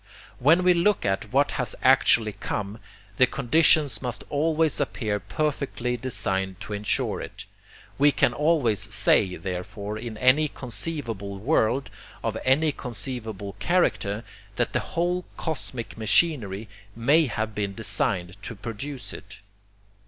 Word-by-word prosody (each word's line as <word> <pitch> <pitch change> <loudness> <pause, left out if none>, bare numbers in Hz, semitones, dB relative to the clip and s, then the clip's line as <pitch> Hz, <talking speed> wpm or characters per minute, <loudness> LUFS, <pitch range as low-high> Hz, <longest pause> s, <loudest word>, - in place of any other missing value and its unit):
When 160 +8 +5
we 180 0 +6
look 180 +4 +2
at 95 -1 -1
what - - +3
has - - -2
actually 110 -2 +5
come, 100 +2 -4 0.4
the 130 - +6
conditions 140 -2 +3
must 125 -2 -4
always 155 +1 +1
appear 110 -7 -1
perfectly 140 -3 -2
designed 95 -6 -2
to 105 - -6
ensure 105 +1 0
it. - - -8 0.5
We 145 +1 +6
can 140 -3 +2
always 145 - +2
say, 90 -2 +3
therefore, 100 +3 -5
in 110 -1 -6
any 130 +6 +4
conceivable 120 -8 -5
world, 125 +2 +1 0.3
of - - -1
any 150 +4 +3
conceivable 110 -5 -5
character, 115 - +1 0.3
that - - 0
the - - +2
whole 175 +2 -1
cosmic 130 - -4
machinery 110 - +2 0.3
MAY 145 +7 +4
have 110 -2 -3
been 100 -2 -3
designed 95 -4 -1
to 115 - -7
produce 120 +6 -6
it. 100 +2 -10
120 Hz, 130 wpm, -25 LUFS, 105-145 Hz, 0.5 s, we